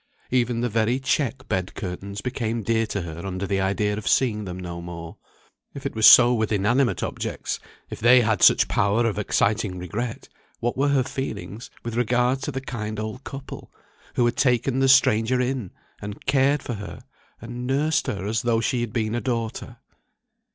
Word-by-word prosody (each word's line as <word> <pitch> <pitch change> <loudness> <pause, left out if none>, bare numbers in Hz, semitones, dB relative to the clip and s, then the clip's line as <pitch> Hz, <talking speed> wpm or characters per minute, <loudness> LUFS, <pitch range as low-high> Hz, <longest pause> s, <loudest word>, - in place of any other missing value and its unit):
Even 120 -2 +1
the 120 - +1
very 115 +3 +1
check 135 -1 -1
bed 95 0 -2
curtains 100 +2 -6
became 115 -3 -3
dear 115 +1 +1
to 100 -3 -3
her 85 0 -7
under 95 0 -3
the 95 0 0
idea 105 +2 0
of 110 - -6
seeing 105 -5 +2
them 90 -1 -6
no 85 -1 -6
more. 85 -1 -8 0.6
If - - -8
it - - -2
was 110 0 +6
so 120 0 +9
with 110 -3 0
inanimate 120 +6 +1
objects, - - -4 0.3
if - - -6
they 125 +2 +6
had 110 -4 +1
such - - +6
power 105 +4 +1
of 105 -2 -1
exciting 105 -1 0
regret, 105 +7 -5 0.3
what 120 +1 -1
were 140 +2 +1
her 140 -2 +3
feelings 115 -4 -6
with 115 - -4
regard 125 +2 +1
to 145 - -3
the 135 0 -4
kind 110 -5 -5
old 110 +5 -5
couple, 135 0 -9 0.4
who 120 - +3
had 120 - 0
taken 125 0 +2
the 135 0 +3
stranger 125 -2 +4
in, 125 -5 -1 0.3
and 105 0 -8
cared 135 +1 +2
for 120 - -4
her, 105 +2 -8 0.4
and 120 +1 -6
nursed 150 +4 +1
her, 95 -2 -3
as 110 +2 0
though 115 -1 +1
she 120 +1 0
had 115 -2 -4
been 110 -2 -1
a 120 - -1
daughter? 120 -1 -3
115 Hz, 185 wpm, -24 LUFS, 105-125 Hz, 0.6 s, so